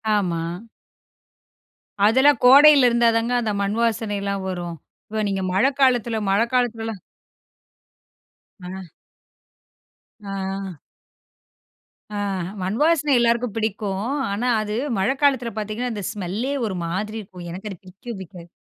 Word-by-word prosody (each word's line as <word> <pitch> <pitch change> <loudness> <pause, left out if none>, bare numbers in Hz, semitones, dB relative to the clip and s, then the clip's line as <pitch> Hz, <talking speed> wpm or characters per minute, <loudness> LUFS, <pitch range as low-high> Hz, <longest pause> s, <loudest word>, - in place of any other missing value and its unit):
ஆமா. 175 -5 0 1.7
அதெல்லாம் 265 +3 +4
கோடையில 280 +1 +8
இருந்தா 235 0 +3
தாங்க 230 +2 -1
அந்த 220 -2 -1
மண் 200 +2 -1
வாசனையெல்லாம் 205 -4 -1
வரும். 175 -2 -4 0.3
இப்ப 215 0 -2
நீங்க 195 -1 -2
மழைக்காலத்துல 245 0 +2
மழைக்காலத்துலலாம் 225 -1 0 1.6
அ. 185 0 -8 1.3
ஆ. 195 -3 -5 1.4
ஆ, - - -2 0.4
மண்வாசனை 290 - +1
எல்லோருக்கும் 235 -1 +1
பிடிக்கும். 205 -2 -2 0.3
ஆனா 215 +5 -1
அது 210 0 -3 0.2
மழைக்காலத்துல 260 +3 +1
பார்த்தீங்கன்னா 215 +4 -3
அந்த 205 -2 -5
ஸ்மெல்லே 210 +7 -3
ஒரு 200 -4 -3
மாதிரி 210 +6 -3
இருக்கும். 180 -3 -11
எனக்கு 195 +5 -7
அது 190 - -8
பிடிக்கவே 195 +6 -9
பிடிக்காது. 175 -2 -11
215 Hz, 105 wpm, -22 LUFS, 195-240 Hz, 1.7 s, கோடையில